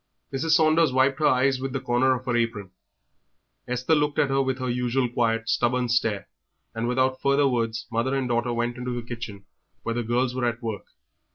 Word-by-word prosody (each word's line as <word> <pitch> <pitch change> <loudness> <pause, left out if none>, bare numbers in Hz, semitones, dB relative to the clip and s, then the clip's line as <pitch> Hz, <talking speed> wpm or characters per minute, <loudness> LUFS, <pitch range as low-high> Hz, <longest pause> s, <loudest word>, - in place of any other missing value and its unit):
Mrs. 155 +4 +1
Saunders 160 -1 +4
wiped 130 +2 +2
her 155 - +3
eyes 130 +1 +3
with 135 0 -4
the 135 - -1
corner 130 +1 +2
of 125 +1 -7
her 125 -2 0
apron; 115 -5 -1 1.0
Esther 125 +4 0
looked 150 -1 +1
at 140 - +3
her 135 0 +3
with 130 -1 -1
her 130 -1 -3
usual 125 +1 0
quiet, 115 -1 0
stubborn 125 +1 +1
stare, 115 -4 0 0.5
and 115 +1 -2
without 130 +1 +1
further 140 +1 +3
words 115 -3 -1
mother 120 +4 0
and 135 -2 -1
daughter 120 0 0
went 120 +1 -2
into 125 0 -3
the 120 - -10
kitchen 110 -5 -7 0.4
where 115 - -2
the 120 - -1
girls 120 +2 0
were 125 -1 -1
at 120 -1 -2
work. 110 -3 -4
125 Hz, 200 wpm, -25 LUFS, 120-130 Hz, 1.0 s, Saunders